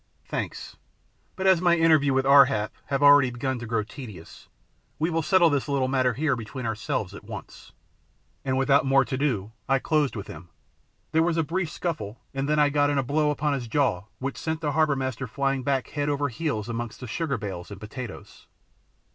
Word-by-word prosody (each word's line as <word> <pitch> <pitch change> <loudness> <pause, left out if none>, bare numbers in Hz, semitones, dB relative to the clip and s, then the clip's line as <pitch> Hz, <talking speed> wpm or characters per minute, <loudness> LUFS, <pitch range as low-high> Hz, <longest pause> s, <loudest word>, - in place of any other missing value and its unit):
"Thanks, - - -5 0.6
but 190 - -4
as 190 -3 +5
my 175 -1 +4
interviews 155 -4 +4
with 135 0 +2
Ar 140 0 +8
hap 105 -5 -2
have 140 0 0
already 145 -2 +7
begun 125 +1 -3
to 120 - -7
grow 115 -1 0
tedious, 110 - -11 0.5
we 160 +3 0
will 165 0 +1
settle 175 0 +4
this 145 0 -1
little 135 -2 +1
matter 130 -2 +1
here 145 -1 +1
between 120 +2 -6
ourselves 110 -2 -2
at - - -10
once." - - -10 0.7
And 130 -1 0
without 135 +1 +4
more 135 0 +4
to 130 - -3
do 120 -8 -1 0.2
I 135 - +4
closed 150 -1 0
with 100 - -5
him. 85 +3 -11 0.6
There 160 - +3
was 165 0 +1
a 165 - +3
brief 170 +2 -2
scuffle 120 - -4
and 135 +1 -2
then 150 - +2
I 150 -1 +4
got 145 0 +2
in 145 - 0
a 135 - +2
blow 150 +3 +1
upon 150 0 0
his 125 -4 -3
jaw 115 -8 0
which 135 +1 -4
sent 160 -1 -2
the 150 -2 0
harbour 155 -1 +2
master 130 -1 -3
flying 135 +2 -1
back 135 0 -1
head 145 0 -2
over 145 0 0
heels 120 -5 -3
amongst 120 -1 -5
the - - -5
sugar 140 +3 -2
bales 95 -5 -6
and 100 -1 -9
potatoes. 110 +1 -9
135 Hz, 205 wpm, -26 LUFS, 120-150 Hz, 0.7 s, Ar